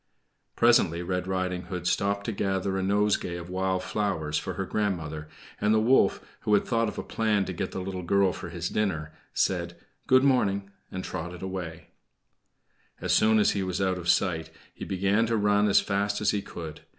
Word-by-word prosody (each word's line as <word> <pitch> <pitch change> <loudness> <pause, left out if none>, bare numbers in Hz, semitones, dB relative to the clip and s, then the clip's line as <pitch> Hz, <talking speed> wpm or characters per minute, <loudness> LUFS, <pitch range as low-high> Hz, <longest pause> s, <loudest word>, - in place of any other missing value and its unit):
Presently 90 -8 +4
Red 90 +1 -2
Riding 95 -1 -1
Hood 90 -2 -5
stopped 100 +2 +1
to - - -1
gather 95 -1 -1
a 95 - 0
nosegay 100 -2 +1
of 85 +1 -8
wild 95 0 0
flowers 80 -8 -2
for - - -2
her - - -2
grandmother, 80 -7 -2 0.3
and 105 +1 +3
the - - +4
wolf, 120 +5 +3 0.2
who 105 - +2
had - - +2
thought 115 -1 +1
of - - -9
a - - -3
plan 105 -3 0
to 95 - -4
get 95 +2 -3
the 95 - -5
little 95 0 -4
girl 95 +1 +2
for - - -7
his - - -3
dinner, 80 -8 -1 0.2
said - - 0 0.3
"Good 130 0 +5
morning," 100 -7 +2 0.2
and 95 - -4
trotted 90 +2 -6
away. 90 -4 -6 1.1
As - - 0
soon 110 0 +5
as 105 - +4
he 100 - -1
was 95 -1 -2
out 95 -1 0
of 85 0 -4
sight, 85 -5 +2 0.2
he - - -7
began 100 +4 +1
to 115 0 +1
run 105 0 +3
as 100 - +5
fast 100 +1 -1
as 105 - +2
he 105 - -1
could. 80 -5 -8
95 Hz, 195 wpm, -27 LUFS, 90-105 Hz, 1.1 s, Good